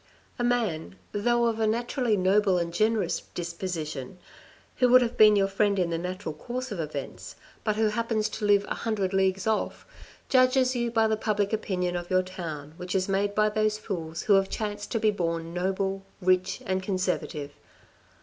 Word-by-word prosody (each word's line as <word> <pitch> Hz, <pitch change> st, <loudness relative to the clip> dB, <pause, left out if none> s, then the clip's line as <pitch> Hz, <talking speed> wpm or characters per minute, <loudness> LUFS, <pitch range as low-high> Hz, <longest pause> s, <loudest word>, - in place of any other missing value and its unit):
A -, -, 0 dB
man, 225 Hz, -10 st, 0 dB, 0.2 s
though 240 Hz, +3 st, +2 dB
of 225 Hz, -1 st, 0 dB
a 220 Hz, -, +2 dB
naturally 235 Hz, 0 st, 0 dB
noble 190 Hz, 0 st, +3 dB
and 170 Hz, -1 st, -2 dB
generous 215 Hz, -1 st, +1 dB
disposition, 170 Hz, -4 st, -4 dB, 0.6 s
who 250 Hz, -, +4 dB
would 255 Hz, +1 st, +7 dB
have 235 Hz, -, -3 dB
been 215 Hz, -1 st, +7 dB
your 195 Hz, -1 st, +3 dB
friend 200 Hz, +1 st, +1 dB
in 175 Hz, -2 st, +1 dB
the 165 Hz, -, 0 dB
natural 180 Hz, -2 st, -4 dB
course 250 Hz, +10 st, -5 dB
of 200 Hz, -, -4 dB
events, 150 Hz, -3 st, -6 dB, 0.3 s
but 215 Hz, -2 st, 0 dB
who 220 Hz, 0 st, +2 dB
happens 220 Hz, 0 st, 0 dB
to 215 Hz, 0 st, -4 dB
live 205 Hz, 0 st, +4 dB
a -, -, -2 dB
hundred 200 Hz, -4 st, -2 dB
leagues 190 Hz, 0 st, +1 dB
off, 220 Hz, -1 st, -1 dB, 0.4 s
judges 255 Hz, 0 st, +4 dB
you 240 Hz, -1 st, 0 dB
by 225 Hz, -1 st, +3 dB
the 220 Hz, 0 st, +1 dB
public 210 Hz, -1 st, 0 dB
opinion 180 Hz, -4 st, -1 dB
of 175 Hz, 0 st, -4 dB
your 185 Hz, 0 st, +3 dB
town 160 Hz, -5 st, -7 dB
which 180 Hz, +1 st, -5 dB
is 185 Hz, -1 st, +1 dB
made 200 Hz, +1 st, 0 dB
by 215 Hz, 0 st, +4 dB
those 215 Hz, 0 st, +1 dB
fools 170 Hz, -6 st, -5 dB
who 210 Hz, -, +4 dB
have 195 Hz, 0 st, +4 dB
chanced 205 Hz, -1 st, -4 dB
to 225 Hz, -, -1 dB
be 215 Hz, -1 st, +3 dB
born 165 Hz, -3 st, -2 dB
noble, 190 Hz, +2 st, -1 dB, 0.2 s
rich 185 Hz, 0 st, +1 dB
and 190 Hz, 0 st, 0 dB
conservative. 185 Hz, -6 st, -2 dB
195 Hz, 185 wpm, -27 LUFS, 180-220 Hz, 0.6 s, would